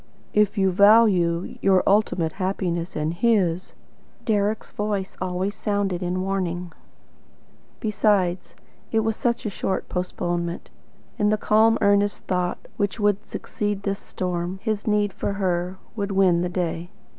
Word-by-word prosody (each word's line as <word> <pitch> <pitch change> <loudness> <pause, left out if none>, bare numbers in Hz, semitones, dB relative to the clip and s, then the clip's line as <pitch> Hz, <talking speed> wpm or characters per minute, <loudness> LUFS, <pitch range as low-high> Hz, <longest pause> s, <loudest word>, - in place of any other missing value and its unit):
"IF 210 0 +2
YOU 190 -1 +3
VALUE 190 -4 +4
YOUR 190 -2 +4
ULTIMATE 195 -5 +2
HAPPINESS 185 -2 -2
AND 155 +1 -1
HIS," 185 -3 +1 0.5
Deryck's 210 0 0
voice 205 -2 -3
always 185 +2 -1
sounded 200 -4 -1
in 180 +1 -1
warning. 180 -3 -2 1.1
Besides, 205 -4 +1 0.4
it 225 - +3
was 220 0 0
such 235 0 -1
a - - 0
short 190 0 -2
postponement. 175 -1 -3 0.5
In 210 0 +3
the 215 - +2
calm 220 +2 +4
earnest 205 0 +2
thought 180 -1 -2
which 205 +1 -1
would 205 -1 +2
succeed 205 -1 -3
this 200 0 -2
storm, 180 0 -3
his 215 -2 -2
need 210 -1 +2
of 200 - -1
her, 180 -1 -1 0.2
would 200 -2 -2
win 185 -3 +4
the 180 - -1
day. 175 -1 -3
195 Hz, 135 wpm, -24 LUFS, 180-210 Hz, 1.1 s, VALUE